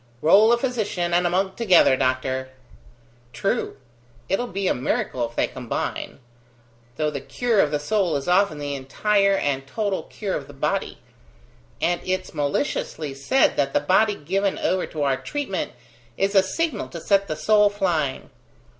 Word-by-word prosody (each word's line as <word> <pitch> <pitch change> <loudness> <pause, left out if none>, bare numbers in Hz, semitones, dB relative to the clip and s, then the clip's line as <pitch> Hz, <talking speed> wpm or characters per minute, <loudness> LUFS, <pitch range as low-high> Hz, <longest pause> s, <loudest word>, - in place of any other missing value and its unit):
"Roll 205 +8 +6
a 240 - +4
physician 215 -9 -2
and 175 0 +3
a - - 0
monk 190 +2 0
together, 185 - +5
doctor!" 130 0 -1 0.8
"True: 210 - -2 0.5
it'll 245 +6 0
be 195 -2 -2
a - - +3
miracle 125 0 -1
if 120 - -19
they - - +2
combine. 125 -3 -4 0.8
Though 150 -1 0
the 140 -2 -5
cure 240 -4 0
of 155 - +4
the 150 - 0
soul 180 +2 0
is 140 -1 -3
often 180 -2 +3
the 145 -1 -4
entire 195 +9 +1
and 135 -6 -1
total 205 +2 -2
cure 200 -3 -5
of 140 - -5
the 145 - -13
body: 135 - -2 0.8
and 175 0 0
it's 185 0 -3
maliciously 145 - -2
said 140 - +2
that 140 -1 +1
the - - +4
body 200 +8 +3
given 195 +6 -1
over 185 0 0
to 155 -2 -4
our 135 -2 +1
treatment 285 - -4 0.4
is 195 +1 +1
a 195 - +7
signal 255 - -2
to 170 - -8
set 200 +3 +2
the 155 - -3
soul 210 +6 +4
flying. 170 -9 -1
180 Hz, 165 wpm, -23 LUFS, 145-205 Hz, 0.8 s, a